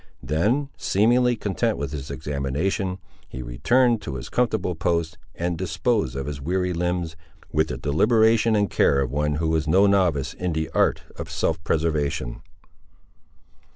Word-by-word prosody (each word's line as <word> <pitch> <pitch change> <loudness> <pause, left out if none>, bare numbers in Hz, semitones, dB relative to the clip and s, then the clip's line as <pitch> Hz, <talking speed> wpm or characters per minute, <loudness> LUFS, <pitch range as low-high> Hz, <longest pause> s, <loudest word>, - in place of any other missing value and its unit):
Then, 105 - +1
seemingly 120 +4 +3
content 110 +1 -1
with 70 -1 -4
his 70 -2 -6
examination, 75 +8 -2 0.3
he 65 - -6
returned 115 - +2
to 75 -9 -5
his 65 -1 -6
comfortable 110 -7 0
post 85 -1 -1 0.2
and 85 0 -1
disposed 90 - -1
of 70 0 -3
his 70 -1 -5
weary 90 +4 -1
limbs, 85 -1 -2 0.4
with 80 +2 +2
the - - -4
deliberation 110 +8 +3
and 105 -1 +2
care 70 - +3
of 65 -3 -2
one 75 +1 0
who 80 +1 -1
was 80 -1 0
no 95 +6 +5
novice 90 -8 +2
in 90 -2 -3
the 80 -1 -2
art - - +2
of - - -6
self 80 -1 -1
preservation. 75 -7 -1
85 Hz, 155 wpm, -24 LUFS, 75-100 Hz, 0.4 s, no